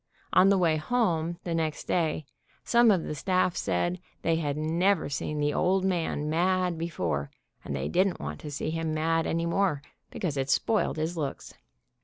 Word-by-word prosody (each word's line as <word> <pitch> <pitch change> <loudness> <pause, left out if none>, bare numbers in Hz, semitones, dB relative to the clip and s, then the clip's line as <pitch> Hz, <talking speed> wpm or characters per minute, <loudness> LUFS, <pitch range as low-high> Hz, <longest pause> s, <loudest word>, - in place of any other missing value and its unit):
On 185 +1 +6
the 200 - +4
way 165 -4 +3
home, 170 -3 0
the 170 - -3
next 160 -2 -1
day, 160 -3 0 0.4
some 235 -1 +5
of 185 -6 +3
the - - -4
staff 185 +2 +1
said 175 +1 -1 0.2
they 165 -1 +2
had 145 -3 -2
never 170 +3 +1
seen 150 +1 -3
the 145 0 +1
"old 190 +1 +2
man" 165 -5 -1
mad 180 +2 +1
before, 85 - -2 0.3
and 70 - -4
they 70 +1 -2
didn't 185 - +1
want - - -5
to 150 - -7
see 145 +2 -3
him 160 -1 -2
mad 165 +1 +1
any 165 +1 0
more, 170 -4 +1 0.3
because 165 -8 -3
it 135 0 -1
spoiled 215 +3 +1
his 160 +3 -2
looks. 145 -4 -4
165 Hz, 180 wpm, -28 LUFS, 150-185 Hz, 0.4 s, On